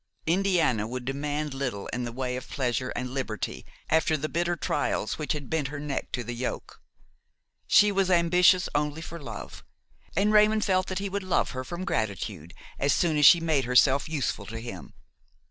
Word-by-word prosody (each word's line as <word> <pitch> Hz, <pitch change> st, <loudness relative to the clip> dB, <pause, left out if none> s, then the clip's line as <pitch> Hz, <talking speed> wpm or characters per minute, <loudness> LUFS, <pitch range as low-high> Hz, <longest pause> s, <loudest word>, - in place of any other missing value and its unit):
Indiana 165 Hz, -, +2 dB
would 125 Hz, +1 st, -5 dB
demand 145 Hz, +2 st, -3 dB
little 125 Hz, -7 st, -3 dB
in 125 Hz, 0 st, -3 dB
the 120 Hz, -, -5 dB
way 125 Hz, +1 st, -3 dB
of 130 Hz, 0 st, -7 dB
pleasure 130 Hz, -1 st, -1 dB
and 125 Hz, 0 st, -3 dB
liberty 130 Hz, -6 st, -4 dB, 0.2 s
after 160 Hz, 0 st, +2 dB
the 155 Hz, +2 st, -3 dB
bitter 175 Hz, +2 st, -1 dB
trials 140 Hz, -6 st, -1 dB
which 150 Hz, -, -1 dB
had 145 Hz, -3 st, -6 dB
bent 160 Hz, -4 st, -1 dB
her 145 Hz, +2 st, -6 dB
neck 145 Hz, -2 st, -4 dB
to 125 Hz, -, -2 dB
the 120 Hz, +1 st, -5 dB
yoke. 125 Hz, +2 st, -5 dB, 0.9 s
She 205 Hz, 0 st, +6 dB
was 195 Hz, -1 st, +1 dB
ambitious 180 Hz, +1 st, +4 dB
only 150 Hz, +2 st, -1 dB
for 170 Hz, +1 st, -8 dB
love, 145 Hz, -, -8 dB, 0.5 s
and 205 Hz, +4 st, +2 dB
Raymon 215 Hz, +1 st, +5 dB
felt 185 Hz, -2 st, +1 dB
that 185 Hz, -, -3 dB
he 200 Hz, +1 st, -2 dB
would 200 Hz, +1 st, -3 dB
love 185 Hz, -1 st, 0 dB
her 130 Hz, -1 st, -4 dB
from 175 Hz, +6 st, -6 dB
gratitude 100 Hz, -, -3 dB, 0.2 s
as 140 Hz, 0 st, +2 dB
soon 165 Hz, -3 st, +1 dB
as 145 Hz, -2 st, +7 dB
she 170 Hz, -, +8 dB
made 155 Hz, -5 st, +1 dB
herself 130 Hz, +4 st, +4 dB
useful 135 Hz, -9 st, -2 dB
to 115 Hz, -, -6 dB
him. 95 Hz, -, -9 dB
145 Hz, 185 wpm, -27 LUFS, 125-175 Hz, 0.9 s, she